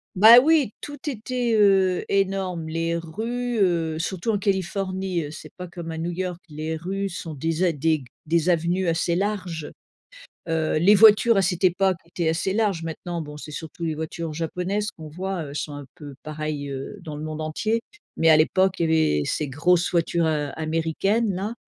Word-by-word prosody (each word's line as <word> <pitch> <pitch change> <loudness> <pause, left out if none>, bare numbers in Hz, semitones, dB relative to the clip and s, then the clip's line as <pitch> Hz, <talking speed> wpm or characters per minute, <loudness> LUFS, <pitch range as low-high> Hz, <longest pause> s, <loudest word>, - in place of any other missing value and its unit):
Bah 225 +5 +10
oui! 295 -4 +3
Tout 290 0 -7
était, 245 -1 -2
heu, 195 -3 +4
énorme. 190 -4 0
Les 165 +1 -1
rues, 230 +8 -3
heu, 165 -4 +1
surtout 190 +6 -2
en 205 - 0
Californie, 190 -2 -1
heu, 145 - -7
c'est - - -10
pas 180 -1 -6
comme 170 -1 -7
à 160 - -5
New 170 +2 -2
York, 180 0 -4
les 155 +1 -4
rues 195 +5 -3
sont 165 -2 -6
des 160 +4 -2
a 180 - +4
des 160 +1 +1
g 140 - -11 0.2
des 165 +2 +1
avenues 175 +2 +1
assez 165 +1 +1
larges, 185 -6 -3 0.8
heu, 160 -1 +1
les 180 +6 +6
voitures 215 +1 +7
à - - +5
cette 180 0 -1
époque 185 +1 +3
étaient 170 0 -3
assez 170 +4 0
larges, 200 -6 0
maintenant 170 +1 -5
bon 150 -1 -8
c'est 150 - -9
surtout 160 +3 -7
les 160 -2 -1
voitures 160 +1 -5
japonaises 180 +6 -2
qu'on 160 -1 -11
voit, 185 +4 -4
heu, - - -8
elles 140 - -9
sont 150 0 -4
un 145 -1 -8
peu 145 -5 -10
pareil, 155 -2 -4
heu, 135 +9 -6
dans 155 -3 -7
le 150 - -6
monde 155 0 -5
entier. 215 +9 -1 0.4
Mais 165 - +4
à 155 - +8
l'époque, 190 +4 +3
il 165 - +1
y 160 - +3
avait 75 - -1
ces 150 - -1
grosses 170 +6 +2
voitures, 170 -1 +1
heu, 150 -2 0
américaines-là, 190 +7 0
170 Hz, 195 wpm, -24 LUFS, 160-195 Hz, 0.8 s, Bah